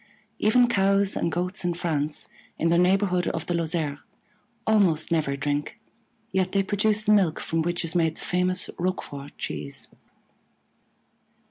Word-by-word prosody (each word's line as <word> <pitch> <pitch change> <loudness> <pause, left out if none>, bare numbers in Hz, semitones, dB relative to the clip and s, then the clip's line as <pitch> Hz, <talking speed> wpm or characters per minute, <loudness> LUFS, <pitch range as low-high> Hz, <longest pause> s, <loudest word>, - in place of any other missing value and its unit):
Even 240 +3 +4
Cows 200 -2 +2
and 170 - -1
Goats 180 +3 -2
in 175 -1 0
France, 155 -3 -2 0.3
in 165 - +1
the 170 +1 +4
neighborhood 180 -1 +2
of 165 - -2
the 175 - -2
Lozère, 160 -3 -1 0.7
almost 190 -9 +3
never 150 -4 +1
drink, 145 +1 -2 0.5
yet 190 -1 0
they 195 -1 +3
produce 210 +2 +1
the 215 - +2
milk 185 -7 +3
from 165 -1 -1
which 175 +1 -1
is 160 - -2
made 165 -2 +1
the - - -11
famous 185 0 +1
Roquefort 145 -6 -4
cheese. 75 -2 -6
175 Hz, 145 wpm, -25 LUFS, 160-195 Hz, 0.7 s, Even